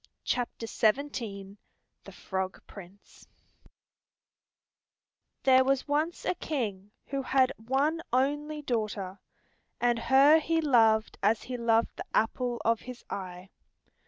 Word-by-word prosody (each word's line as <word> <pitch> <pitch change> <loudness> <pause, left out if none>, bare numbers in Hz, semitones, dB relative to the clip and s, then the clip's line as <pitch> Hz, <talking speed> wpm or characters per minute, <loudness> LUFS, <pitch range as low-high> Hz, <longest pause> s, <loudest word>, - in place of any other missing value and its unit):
THE 225 -4 -2 0.5
FROG 190 -1 -5
PRINCE 195 0 -14 2.2
There 260 -1 +6
was 270 0 0
once 305 +4 -1
a - - +1
king 215 - -4 0.2
who 275 0 -3
had 260 0 +2
one 275 +8 0
only 295 +4 0
daughter, 210 -6 -3 0.6
and 240 -1 +2
her 275 +6 +6
he 325 +1 0
loved 225 -7 +3
as 215 +2 +2
he 255 - -5
loved 230 -1 +1
the - - -6
apple 240 +2 0
of 230 0 +3
his 250 -1 -10
eye. 185 -1 -7
240 Hz, 105 wpm, -29 LUFS, 215-275 Hz, 2.2 s, There